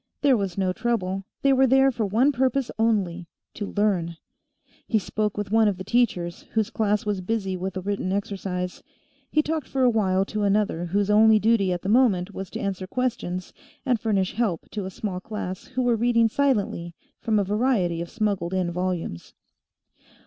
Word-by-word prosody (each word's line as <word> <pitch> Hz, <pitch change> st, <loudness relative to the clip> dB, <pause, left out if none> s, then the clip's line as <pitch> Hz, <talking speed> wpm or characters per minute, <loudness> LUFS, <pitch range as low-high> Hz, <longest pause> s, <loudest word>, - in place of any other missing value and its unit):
There 280 Hz, -3 st, +5 dB
was 195 Hz, -5 st, -2 dB
no 185 Hz, -2 st, +1 dB
trouble; 195 Hz, -4 st, -1 dB, 0.2 s
they 275 Hz, 0 st, +5 dB
were 265 Hz, 0 st, +4 dB
there 270 Hz, +1 st, +5 dB
for 230 Hz, -4 st, -2 dB
one 235 Hz, +9 st, +3 dB
purpose 265 Hz, -1 st, 0 dB
only 190 Hz, -6 st, 0 dB, 0.3 s
to 205 Hz, -, -5 dB
learn. 185 Hz, -6 st, 0 dB, 0.7 s
He 225 Hz, -, +2 dB
spoke 210 Hz, +1 st, -2 dB
with 205 Hz, -1 st, -3 dB
one 225 Hz, 0 st, +4 dB
of 200 Hz, -3 st, 0 dB
the 185 Hz, -, -6 dB
teachers, 190 Hz, -6 st, 0 dB
whose 220 Hz, -2 st, 0 dB
class 210 Hz, 0 st, 0 dB
was 205 Hz, -3 st, -1 dB
busy 195 Hz, -1 st, -2 dB
with 190 Hz, +1 st, -4 dB
a -, -, -3 dB
written 195 Hz, -1 st, -2 dB
exercise; 190 Hz, -2 st, -3 dB, 0.5 s
he 305 Hz, -, +2 dB
talked 310 Hz, -2 st, -2 dB
for 265 Hz, -1 st, 0 dB
a 250 Hz, -, +5 dB
while 195 Hz, -4 st, +2 dB
to 215 Hz, +1 st, -3 dB
another 200 Hz, -4 st, +1 dB
whose 200 Hz, +3 st, 0 dB
only 220 Hz, +1 st, +6 dB
duty 215 Hz, -3 st, +2 dB
at 175 Hz, -1 st, -3 dB
the -, -, -4 dB
moment 205 Hz, -5 st, +3 dB
was 190 Hz, -1 st, -6 dB
to -, -, -6 dB
answer 190 Hz, -1 st, -3 dB
questions 185 Hz, -7 st, -3 dB, 0.3 s
and 250 Hz, -4 st, +2 dB
furnish 200 Hz, -4 st, 0 dB
help 205 Hz, -7 st, -1 dB
to 205 Hz, -3 st, -4 dB
a -, -, -4 dB
small 190 Hz, -1 st, -4 dB
class 190 Hz, -2 st, -6 dB
who 255 Hz, 0 st, -2 dB
were 245 Hz, -1 st, +3 dB
reading 230 Hz, 0 st, +3 dB
silently 210 Hz, -10 st, 0 dB, 0.2 s
from 220 Hz, -2 st, +1 dB
a 205 Hz, -, +3 dB
variety 200 Hz, -5 st, +1 dB
of 170 Hz, -, -5 dB
smuggled 200 Hz, -5 st, -1 dB
in 180 Hz, -2 st, 0 dB
volumes. 180 Hz, -, -4 dB
205 Hz, 185 wpm, -25 LUFS, 185-230 Hz, 0.7 s, only